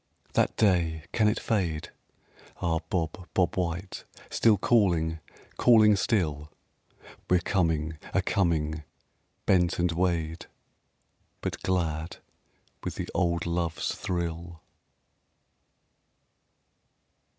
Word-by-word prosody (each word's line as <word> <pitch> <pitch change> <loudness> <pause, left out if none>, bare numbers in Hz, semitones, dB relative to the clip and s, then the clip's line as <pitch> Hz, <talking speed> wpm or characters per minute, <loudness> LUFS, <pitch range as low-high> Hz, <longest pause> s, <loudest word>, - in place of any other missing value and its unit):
That - - +2
day, 85 -7 +2
can 110 -2 +3
it 105 - +1
fade?... 90 -9 -1 0.7
ah, 85 -2 0
bob, 90 +1 -2
bob 90 -2 +2
white, 90 +1 -3 0.3
Still 110 -3 +4
calling 85 -7 +2 0.4
calling 110 -3 +6
still? 75 -9 0 0.8
We're 90 - +5
coming 80 -4 0
a - - +1
coming, 80 -4 0 0.6
bent 90 -2 +3
and 85 0 +1
weighed, 85 -1 -1 0.9
But - - -4
glad 85 -3 -1 0.7
with - - -4
the - - -5
old 85 -2 0
love's 85 -1 -1
thrill! 85 -2 -4
85 Hz, 95 wpm, -28 LUFS, 80-95 Hz, 0.9 s, calling